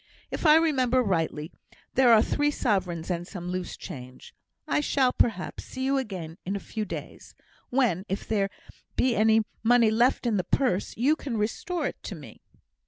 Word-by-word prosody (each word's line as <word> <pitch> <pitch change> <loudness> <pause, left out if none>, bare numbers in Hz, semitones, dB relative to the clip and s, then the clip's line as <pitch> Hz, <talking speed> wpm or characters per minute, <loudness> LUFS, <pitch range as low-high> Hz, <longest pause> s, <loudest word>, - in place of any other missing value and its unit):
If - - 0
I 305 - +8
remember 260 -6 +3
rightly, 165 -6 -1 0.4
there 255 -2 +5
are 220 -1 +7
three 290 0 +1
sovereigns 190 - -1
and 175 0 -3
some 180 -3 -6
loose 185 -1 -4
change; 130 -7 -10 0.3
I - - +2
shall, 270 -3 +2
perhaps, 200 -6 0
see 260 - -6
you 275 0 +2
again 180 -9 -6
in 195 +2 -3
a - - -2
few 215 +2 -4
days, - - -8 0.3
when, 225 -8 +1
if 195 - -3
there 200 -3 +1 0.5
be 250 -2 +2
any 220 0 +4 0.2
money 230 -1 +4
left 240 +4 +2
in 225 -3 +2
the 185 - 0
purse, 205 -1 0
you 275 +7 +3
can 265 -7 -4
restore 295 +10 -2
it - - -4
to 200 - -6
me." 150 -4 -12
220 Hz, 175 wpm, -27 LUFS, 185-260 Hz, 0.5 s, I